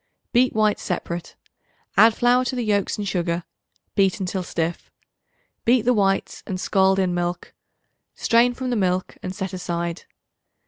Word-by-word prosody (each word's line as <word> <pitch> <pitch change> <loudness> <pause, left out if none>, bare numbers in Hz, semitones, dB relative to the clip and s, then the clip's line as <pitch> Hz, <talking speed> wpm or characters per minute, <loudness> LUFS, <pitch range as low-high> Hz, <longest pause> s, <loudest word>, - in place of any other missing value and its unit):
Beat 250 +1 +4
whites 215 -1 +2
separate; 175 -2 -4 0.6
add 225 0 +6
flour 245 +1 +3
to 255 - -2
the 245 -2 -2
yolks 205 -2 0
and 205 -1 -3
sugar; 175 -2 -1 0.5
beat 195 -1 +2
until 190 0 -2
stiff. 170 -1 -3 0.7
Beat 240 -1 +3
the 250 +1 +3
whites 195 -3 0
and 185 -2 -3
scald 190 0 +3
in 185 -2 +1
milk; 175 0 -3 0.6
strain 240 +1 +3
from 255 0 -3
the - - +1
milk, 185 -3 -1
and 185 - -5
set 190 0 -4
aside. 170 -1 -3
195 Hz, 150 wpm, -23 LUFS, 180-230 Hz, 0.7 s, add